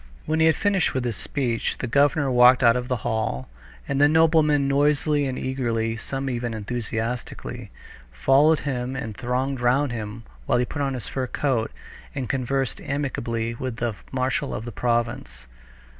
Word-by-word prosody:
When 155 +1 0
he 160 - +5
had 160 - +4
finished 200 -7 +1
with 130 -1 0
his 120 -3 -1
speech, 120 0 -2
the - - -3
governor 140 +2 +2
walked 125 +1 +6
out 115 0 +6
of 125 0 -2
the 125 - 0
hall, 110 - -1 0.4
and 140 0 0
the 145 - +7
noblemen 155 -3 +4
noisily 145 +1 +2
and 130 - -3
eagerly—some 120 +1 -2
even 120 -2 -2
enthusiastically—followed 115 - -1
him 130 -2 -3
and 110 -6 -5
thronged 130 +2 -2
round 130 +3 +2
him 110 0 -5 0.2
while - - +3
he 125 - +2
put 145 - -5
on 135 -1 0
his 125 - -5
fur 130 -1 -2
coat 125 -5 0 0.5
and 130 -3 -3
conversed 135 -1 -1
amicably 115 -5 -2
with 125 0 -4
the 115 -1 -2 0.2
marshal 130 0 -1
of 110 - -5
the 120 - -5
province. 120 - -2
125 Hz, 160 wpm, -24 LUFS, 115-140 Hz, 0.5 s, the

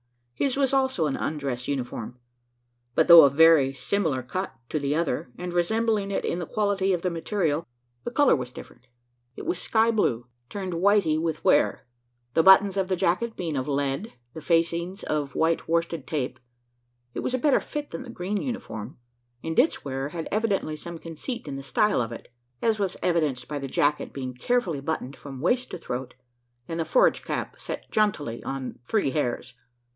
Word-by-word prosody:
His 270 - 0
was 275 -1 +2
also 265 -11 +2
an 145 - 0
undress 135 -5 -3
uniform; 125 -3 -4 0.8
but, - - +4
though 170 -1 +11
of 140 -2 +5
very 160 -4 +6
similar 140 0 -1
cut 185 +10 -3 0.2
to 155 - -1
the 140 +1 0
other, 150 -6 -1
and 180 0 -5
resembling 215 +3 +1
it 200 - -1
in 170 - -1
the 175 - -4
quality 200 -3 +1
of 175 - -2
the 180 - 0
material, 165 -2 -1 0.4
the - - -1
colour 285 +3 +4
was 125 -3 -5
different. 125 0 -13 0.5
It - - -8
was 350 +2 -2
sky 225 +1 +3
blue, 120 - +1 0.2
turned 190 -3 -4
whitey 170 -3 +3
with 160 -2 -3
wear 145 - +3 0.5
the 165 - +5
buttons 190 +2 +7
of 190 -1 +1
the 185 - +1
jacket 190 +6 0
being 165 -4 -3
of 130 0 -2
lead, 140 +4 -1
and - - -20 0.2
the 160 - -8
facings 170 +4 0
of 145 -2 -2
white 165 +1 +1
worsted 165 0 -1
tape. 140 -5 -3 0.7
It - - -4
was 255 - -1
a - - +1
better 275 +2 +3
fit 295 0 -6
than - - -5
the 260 - -9
green 205 -2 -3
uniform; 200 - -5 0.5
and 160 +4 0
its 275 - +2
wearer 135 0 -3
had 165 +1 -5
evidently 205 -7 0
some 170 +2 -8
conceit 165 - -6
in 140 - -4
the - - -5
style 140 - +2
of 115 0 -3
it 115 +1 -10 0.3
as 220 -2 +2
was 195 -2 -1
evidenced 155 -8 0
by 145 -1 -4
the 135 - -4
jacket 145 +3 +1
being 130 -2 -5
carefully 175 - 0
buttoned 140 -3 -3
from 135 -2 -9
waist 245 - +1
to - - -5
throat, 125 -5 -5 0.5
and 165 0 -4
the 165 - 0
forage - - +3
cap - - -4
set - - -7
jauntily 180 - 0
on 135 -1 -5
"three 195 - 0
hairs." 130 -2 -2
165 Hz, 190 wpm, -26 LUFS, 140-205 Hz, 0.8 s, though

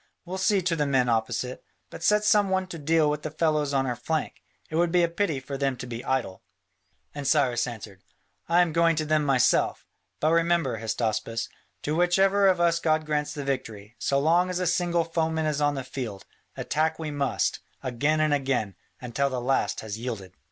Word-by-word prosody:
We'll 185 +2 -5
see 190 0 +2
to 170 -1 +1
the 150 -2 0
men 130 -3 +2
opposite. 120 +2 -1 0.3
But - - -9
set 210 +4 +3
some 210 -2 +4
one 190 0 +1
to 165 - -7
deal 155 +1 +2
with 150 0 -1
the 155 - -4
fellows 155 -2 0
on 135 -1 +1
our 125 -2 -1
flank: 155 +6 -3 0.3
it - - -3
would 170 0 +2
be 175 0 +4
a - - +4
pity 170 -4 -1
for 135 +1 -6
them 135 -2 0
to 125 - -6
be 120 -1 -6
idle." 130 -8 -2 0.7
And 145 -2 -4
Cyrus 130 -5 +2
answered, 105 -5 -9 0.5
"I 175 +1 +5
am 165 -3 -3
going 165 0 +3
to 155 0 -1
them 155 0 +2
myself. 135 -3 +2 0.3
But 155 - +2
remember, 165 -7 +2
Hystaspas, 115 0 -2 0.3
to 150 - -1
which 175 +2 +3
ever 195 +1 +4
of 185 -2 +3
us 170 -1 +3
God 155 -1 +1
grants 150 -1 -1
the 145 - -4
victory, 115 -5 -4
so 140 - +1
long 170 +6 +3
as 180 - -2
a 180 - -1
single 175 -1 +1
foeman 160 -1 -1
is 150 -1 -1
on 145 0 +2
the 135 - -4
field, 125 -6 -6 0.3
attack 160 +1 0
we 155 -2 -4
must, 140 -2 0 0.2
again 145 +5 0
and 155 -1 +2
again, 135 -8 0 0.3
until 130 +3 -1
the 130 -2 -3
last 130 +2 0
has 110 0 -6
yielded." 110 -6 -5
150 Hz, 205 wpm, -26 LUFS, 125-165 Hz, 0.7 s, I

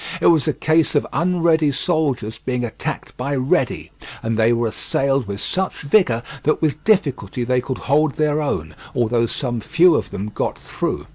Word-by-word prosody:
It - - -2
was 160 -1 +1
a 155 - +2
case 160 0 +1
of 145 - +2
unready 165 -3 +2
soldiers 135 -8 -1
being 125 -1 -1
attacked 115 - -5
by 140 +3 -2
ready, 130 0 0 0.3
and 115 0 -1
they 110 +1 +3
were 120 -1 +1
assailed 135 +2 0
with 100 0 -4
such 190 - -2
vigour 140 - +3 0.2
that 155 - +1
with 150 -1 -1
difficulty 135 - +1
they 125 +1 +1
could 130 0 -4
hold 150 +1 +1
their 150 0 +1
own, 80 - -2 0.2
although 120 -1 +1
some 120 -2 -3
few 175 - +4
of - - -1
them 105 +2 -5
got - - -2
through. - - -4
135 Hz, 180 wpm, -20 LUFS, 120-155 Hz, 0.3 s, few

